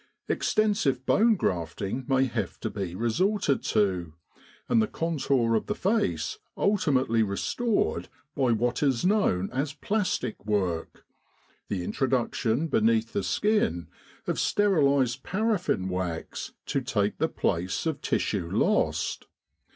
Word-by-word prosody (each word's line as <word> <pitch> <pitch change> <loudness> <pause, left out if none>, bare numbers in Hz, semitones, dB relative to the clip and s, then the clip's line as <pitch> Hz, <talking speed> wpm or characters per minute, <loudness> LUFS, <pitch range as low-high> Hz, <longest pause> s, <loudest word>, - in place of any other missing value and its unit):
Extensive 200 -12 +1
bone 225 +1 +4
grafting 100 - -2
may 135 -1 +3
have 115 -5 -3
to - - -3
be 95 -4 -4
resorted 145 - +1
to, 90 -7 0 0.5
and 115 - +4
the 110 - +1
contour 140 -8 0
of 110 - 0
the 210 - -1
face 180 - 0 0.2
ultimately 135 - +2
restored 100 - 0 0.3
by 130 -4 +2
what 120 +2 0
is 135 -1 +1
known 180 - +2
as 140 +3 -2
plastic 180 - -2
work 95 -6 -2 0.6
the 95 -3 -2
introduction 125 - 0
beneath 115 -4 +2
the 205 - 0
skin 205 - 0 0.4
of - - -1
sterilised 140 - +2
paraffin 190 - 0
wax 90 -3 -4
to 140 - -1
take 105 -5 -1
the - - +1
place 90 - -1
of 160 -3 -2
tissue 90 -5 -1
lost. - - 0
125 Hz, 120 wpm, -27 LUFS, 100-165 Hz, 0.6 s, bone